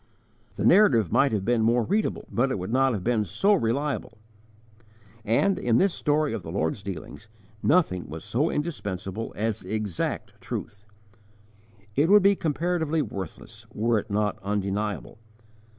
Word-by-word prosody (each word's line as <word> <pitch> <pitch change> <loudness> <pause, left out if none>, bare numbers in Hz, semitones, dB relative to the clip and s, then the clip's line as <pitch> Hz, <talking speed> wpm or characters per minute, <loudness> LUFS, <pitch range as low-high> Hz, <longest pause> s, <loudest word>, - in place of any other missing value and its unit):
The - - -2
narrative 125 - +5
might 140 - +3
have 100 -3 -1
been 120 0 +2
more 120 +2 +3
readable, 210 - -1
but 125 +3 +1
it 130 - -1
would 95 +5 -4
not 135 0 +3
have 100 -5 -3
been 115 -1 +1
so 195 - +2
reliable; 140 - -1 1.1
and, 120 - +2
in 120 -1 +2
this 195 -2 +3
story 150 -2 0
of 115 - -3
the 80 - -8
Lord's 80 +1 -1
dealings, 95 +2 -8 0.3
nothing 120 - +2
was 80 +1 -7
so 145 +8 0
indispensable 110 - -4
as 110 +1 -1
exact 105 -2 -3
truth. 105 0 -6 1.1
It 150 +4 +3
would 205 -1 +7
be 200 0 +5
comparatively 160 -1 0
worthless, 95 - -8
were 115 +1 +2
it - - -9
not 105 0 0
undeniable. 105 +2 -3
115 Hz, 150 wpm, -26 LUFS, 100-150 Hz, 1.1 s, would